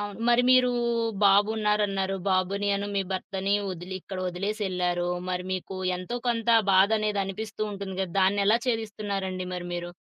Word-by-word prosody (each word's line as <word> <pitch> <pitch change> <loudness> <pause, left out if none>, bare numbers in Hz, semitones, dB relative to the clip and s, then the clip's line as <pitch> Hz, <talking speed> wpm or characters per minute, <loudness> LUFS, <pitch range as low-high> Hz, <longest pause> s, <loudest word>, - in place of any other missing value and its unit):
అవును. 205 0 -5
మరి 240 +1 +5
మీరూ 255 -1 +5 0.5
బాబున్నారన్నారు, 205 -1 +2
బాబుని 195 +2 +1
అను 200 +1 -3
మీ 195 - +1
భర్తని 195 +1 -1 0.2
ఒదిలి 180 +1 -7
ఇక్కడొదిలేసెళ్లారు. 180 -1 -2 0.2
మరి 180 0 -2
మీకు 185 +1 -4 0.2
ఎంతో 185 +7 -5
కొంత 235 -1 +1 0.2
బాధనేది 210 +2 +3
అనిపిస్తూ 215 +2 -5
ఉంటుందిగ 190 -1 -3
దాన్నెలా 200 +3 +3
చేదిస్తున్నారండి 205 -5 -2
మరి 175 0 -5
మీరు? 175 0 -4
195 Hz, 125 wpm, -27 LUFS, 185-210 Hz, 0.5 s, మరి